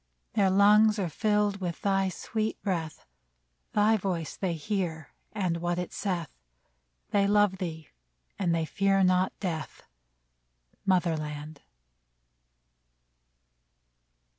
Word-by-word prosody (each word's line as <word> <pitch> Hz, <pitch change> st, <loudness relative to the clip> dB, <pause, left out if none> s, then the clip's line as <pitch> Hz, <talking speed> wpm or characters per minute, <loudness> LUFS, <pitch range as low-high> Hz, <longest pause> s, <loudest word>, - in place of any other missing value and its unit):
Their 200 Hz, -3 st, +3 dB
lungs 210 Hz, +3 st, +5 dB
are 190 Hz, -4 st, -1 dB
filled 210 Hz, +2 st, +1 dB
with 175 Hz, -2 st, -4 dB
thy 195 Hz, -1 st, +2 dB
sweet 220 Hz, +3 st, -3 dB
breath; 165 Hz, -, -3 dB, 0.7 s
Thy 215 Hz, +1 st, +4 dB
voice 180 Hz, -5 st, -3 dB
they 185 Hz, -3 st, -1 dB
hear, 165 Hz, -2 st, -3 dB, 0.2 s
and 185 Hz, -5 st, -1 dB
what 175 Hz, +1 st, -1 dB
it 180 Hz, -1 st, -4 dB
saith; 180 Hz, -6 st, -2 dB, 0.8 s
They 200 Hz, -1 st, +3 dB
love 205 Hz, -2 st, +3 dB
thee, 160 Hz, -4 st, -5 dB, 0.5 s
and 180 Hz, -4 st, +1 dB
they 165 Hz, -1 st, 0 dB
fear 195 Hz, +4 st, +2 dB
not 185 Hz, 0 st, +3 dB
death, 160 Hz, -7 st, -4 dB, 1.0 s
Mother 180 Hz, -3 st, +3 dB
land 150 Hz, 0 st, -6 dB
185 Hz, 110 wpm, -28 LUFS, 165-205 Hz, 1.0 s, lungs